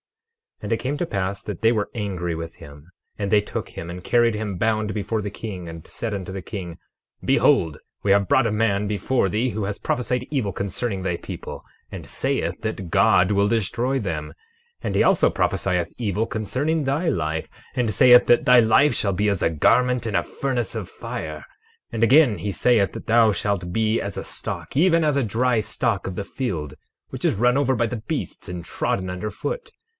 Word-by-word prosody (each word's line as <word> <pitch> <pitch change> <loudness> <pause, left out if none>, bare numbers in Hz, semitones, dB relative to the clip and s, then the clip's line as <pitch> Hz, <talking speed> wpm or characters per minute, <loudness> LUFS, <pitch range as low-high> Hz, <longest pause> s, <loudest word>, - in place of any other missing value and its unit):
12:9 - - -7
And - - 0
it - - +1
came 140 +3 -3
to 175 - -1
pass 100 -3 -2
that 105 -2 -6
they 115 0 +5
were 105 -3 -1
angry 90 -6 -3
with 80 +1 -6
him; 75 +3 -13 0.3
and 100 -2 -2
they 105 -1 +5
took 105 - -5
him 85 - -7
and 90 +1 -7
carried 120 +1 +3
him 105 -3 -3
bound 110 +1 0
before 110 +1 -2
the 100 -1 -4
king, 95 -6 -6
and 80 -1 -9
said 115 -2 -4
unto 95 -2 -4
the 95 0 -5
king: 90 -5 -7 0.5
Behold, 80 -3 +3 0.3
we 100 - +2
have 100 -1 +4
brought 130 - +4
a - - -1
man 105 -2 +1
before 105 +3 0
thee 110 +6 0
who 110 -2 -3
has 100 0 -4
prophesied 125 +1 -1
evil 125 -9 0
concerning 100 +1 -3
thy 90 -2 -1
people, - - -8 0.3
and - - -7
saith - - -2
that 105 -4 -4
God 90 +2 +4
will 100 0 +3
destroy 115 +4 0
them. 105 -5 -3
12:10 - - -14 0.5
And - - -2
he - - +4
also - - +4
prophesieth - - 0
evil 110 -2 -1
concerning 135 +7 -1
thy 145 +6 0
life, 80 -1 -2 0.3
and 120 -4 +1
saith 125 +3 +7
that 120 - +4
thy 125 -1 +7
life 120 +6 +5
shall 100 -2 0
be 105 +3 +1
as 100 -3 -1
a - - +3
garment 125 +10 +2
in 110 -3 -2
a - - +4
furnace 125 -6 -3
of - - -4
fire. 75 -1 -6 0.5
12:11 - - -25
And 115 0 0
again, 130 -2 +5
he 105 - -2
saith 105 +1 +2
that - - -8
thou 115 -1 +5
shalt 95 -2 -2
be 110 +1 +1
as 100 -2 -5
a - - -3
stalk, - - -6
even 165 0 +4
as 150 -2 +2
a 140 - +2
dry 120 +2 +1
stalk 105 - -1
of 95 - -4
the 100 - -3
field, 95 - -4 0.4
which - - -5
is - - +3
run 125 +5 +3
over 135 -2 +2
by 120 -1 +1
the 120 - -4
beasts 110 - -5
and 90 -1 -5
trodden 95 +3 -2
under 90 +4 -4
foot. 485 - -5
105 Hz, 210 wpm, -23 LUFS, 95-120 Hz, 0.5 s, saith